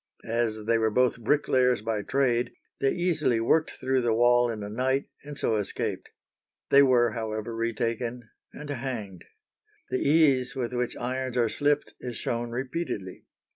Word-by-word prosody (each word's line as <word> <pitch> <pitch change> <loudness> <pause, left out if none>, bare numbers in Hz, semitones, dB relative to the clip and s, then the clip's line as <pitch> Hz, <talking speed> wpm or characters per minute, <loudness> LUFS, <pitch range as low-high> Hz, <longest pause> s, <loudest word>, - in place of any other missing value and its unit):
As 115 -2 -1
they 115 0 +2
were 110 0 +2
both 125 +2 +2
bricklayers 125 -2 +2
by 110 -2 -1
trade, 125 0 0 0.3
they 135 - +2
easily 160 -9 +1
worked 155 +8 +2
through 130 0 -1
the 115 -2 +1
wall 120 +1 +4
in 110 -3 -4
a - - -5
night, 130 +5 0 0.2
and 145 0 -8
so 110 - +1
escaped. 105 - -3 0.6
They 140 - +8
were, 125 -4 +4
however, 110 0 -4
retaken 115 +1 -2 0.2
and 150 -1 -8
hanged. 115 -9 -5 0.7
The - - +1
ease 140 -4 +3
with 125 -2 -3
which 125 -1 -2
irons 130 0 -3
are 120 -2 +3
slipped 145 +3 0
is 120 -3 -6
shown 120 0 -2
repeatedly. 125 - -4
120 Hz, 155 wpm, -27 LUFS, 115-130 Hz, 0.7 s, They